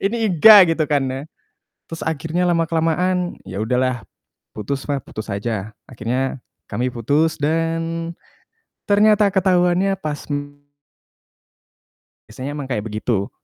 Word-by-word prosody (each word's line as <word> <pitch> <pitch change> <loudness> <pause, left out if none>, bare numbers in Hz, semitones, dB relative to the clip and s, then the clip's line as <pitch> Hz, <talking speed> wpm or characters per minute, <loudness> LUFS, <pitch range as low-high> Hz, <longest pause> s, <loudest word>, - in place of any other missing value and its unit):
Ini 205 +4 0 0.2
enggak, 185 0 +8
gitu 160 -2 -1
kan 145 -3 +2
ya. 135 - -4 0.6
Terus 165 - -8
akhirnya 160 +3 -1
lama-kelamaan, 170 +2 0
ya 95 +1 -6
udahlah, 125 +2 0 0.6
putus 130 +8 -4
mah, 140 -3 -2
putus 110 - -8
aja. 105 0 -4
Akhirnya 130 +3 -3 0.2
kami 120 +4 -2
putus 145 +7 0
dan 165 +2 -1 0.8
ternyata 210 0 +5
ketahuannya 185 0 +2
pas, 150 -1 -4
mmm 145 0 -6 1.6
biasanya 130 +6 -6
emang 145 -2 -5
kayak 105 -6 -2
begitu. 110 -2 -2
150 Hz, 115 wpm, -20 LUFS, 125-170 Hz, 1.6 s, enggak